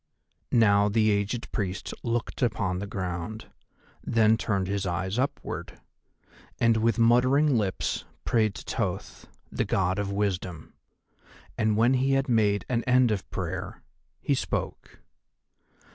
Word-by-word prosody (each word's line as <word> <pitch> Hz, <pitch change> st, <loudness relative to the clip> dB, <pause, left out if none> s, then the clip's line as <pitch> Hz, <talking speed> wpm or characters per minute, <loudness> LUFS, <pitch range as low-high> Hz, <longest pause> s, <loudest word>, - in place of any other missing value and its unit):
Now 105 Hz, -3 st, +4 dB
the 110 Hz, +1 st, +3 dB
aged 105 Hz, +4 st, -2 dB
Priest 95 Hz, -3 st, -3 dB
looked 120 Hz, +2 st, -3 dB
upon 95 Hz, -6 st, 0 dB
the 100 Hz, -, -4 dB
ground, 95 Hz, +2 st, -5 dB, 0.5 s
then 110 Hz, -1 st, +3 dB
turned 100 Hz, -4 st, -1 dB
his 100 Hz, 0 st, -2 dB
eyes 95 Hz, +5 st, -2 dB
upward, 135 Hz, -, -4 dB, 0.8 s
and 115 Hz, -1 st, +4 dB
with 115 Hz, +1 st, +1 dB
muttering 130 Hz, +5 st, +4 dB
lips 100 Hz, -5 st, -1 dB, 0.2 s
prayed 110 Hz, -3 st, +2 dB
to -, -, -8 dB
Thoth, -, -, -3 dB, 0.2 s
the -, -, 0 dB
God 95 Hz, 0 st, 0 dB
of 100 Hz, -1 st, -2 dB
Wisdom. 95 Hz, -5 st, -3 dB, 0.8 s
And 110 Hz, -1 st, +1 dB
when 120 Hz, +4 st, +4 dB
he 135 Hz, +1 st, +2 dB
had 135 Hz, +1 st, +1 dB
made 105 Hz, -5 st, +2 dB
an 120 Hz, -2 st, 0 dB
end 125 Hz, -2 st, +4 dB
of 100 Hz, -3 st, -3 dB
prayer -, -, -5 dB, 0.4 s
he -, -, 0 dB
spoke. -, -, -4 dB
110 Hz, 130 wpm, -27 LUFS, 100-120 Hz, 0.8 s, Now